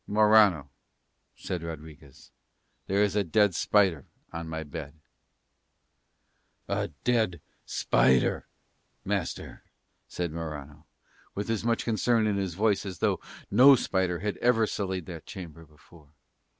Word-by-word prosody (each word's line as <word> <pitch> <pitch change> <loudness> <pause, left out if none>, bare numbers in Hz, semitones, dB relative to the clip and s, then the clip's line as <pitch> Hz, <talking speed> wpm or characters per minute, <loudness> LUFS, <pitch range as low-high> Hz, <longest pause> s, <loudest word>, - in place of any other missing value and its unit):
"Morano," 105 -7 +4 0.7
said 90 -2 -5
Rodriguez, 80 -4 -10 0.6
"there 100 +2 +2
is 105 -1 0
a 105 - +2
dead 105 +2 +2
spider 95 -5 +2 0.3
on 85 -1 -5
my 80 0 -4
bed." 75 -1 -8 1.7
"A - - -1 0.2
dead 110 -8 +1 0.3
spider, 65 +1 +2 0.6
master?" - - -3 0.5
said 85 -2 -4
Morano, 75 -2 -7 0.5
with 100 +3 -3
as 110 -2 -1
much 115 0 0
concern 115 0 +2
in 105 -2 0
his 95 -4 -3
voice 105 +1 +1
as 95 -3 -6
though - - 0 0.3
no 130 +7 +8
spider 95 -6 -1
had 105 0 -2
ever 115 -2 +3
sullied 95 -4 -3
that 85 -4 -9
chamber 85 -6 -9
before. 75 +1 -20
95 Hz, 125 wpm, -28 LUFS, 80-105 Hz, 1.7 s, no